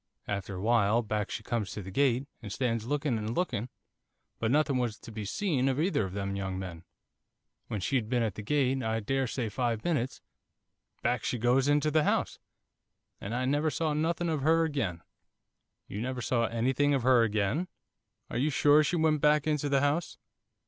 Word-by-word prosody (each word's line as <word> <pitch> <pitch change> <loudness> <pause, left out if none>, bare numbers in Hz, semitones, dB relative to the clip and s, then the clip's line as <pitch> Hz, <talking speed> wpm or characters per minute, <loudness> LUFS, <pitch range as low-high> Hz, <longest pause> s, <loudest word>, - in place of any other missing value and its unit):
After 100 -1 -3
a 90 - -5
while, 115 0 +3
back 105 -1 -2
she - - -5
comes 115 -5 -2
to 105 - -6
the 95 - -8
gate, 135 +2 +2
and 105 -5 -7
stands 115 0 -1
looking 145 -4 0
and 110 +2 -3
looking, 130 - -1 0.7
but 110 - 0
nothing 145 0 +2
was 120 -3 -1
to - - -11
be 110 -1 -5
seen 135 - 0
of 135 +1 -1
either 165 - +1
of 95 - -7
them 100 0 -3
young 95 -1 -3
men. 90 -3 -7 0.8
When 105 - -3
she'd 115 +1 0
been 120 -1 +1
at 110 -4 -1
the 105 - -7
gate, 135 +3 +1
I 110 -1 -1
daresay 130 +1 -1
five 115 0 -1
minutes, 135 -7 -1 0.8
back 125 +1 +1
she 125 - -1
goes 125 +4 +2
into 145 +1 +3
the 155 0 +3
house, - - 0 0.8
and 110 +4 -4
I 130 +1 0
never 145 +4 +1
saw 155 0 -1
nothing 165 +3 0
of 155 -3 -1
her 165 +3 +4
again.' 115 - -2 0.8
'You 105 - -5
never 125 0 -3
saw 115 -1 +1
anything 130 +5 +1
of 130 - -1
her 125 -1 +5
again? 110 - 0 0.6
Are - - -1
you 145 +4 +2
sure 150 +1 +5
she 180 +4 0
went 155 -3 +2
back 150 -1 +4
into 150 -2 0
the 140 -1 +3
house? 145 +4 0
125 Hz, 190 wpm, -30 LUFS, 110-145 Hz, 0.8 s, her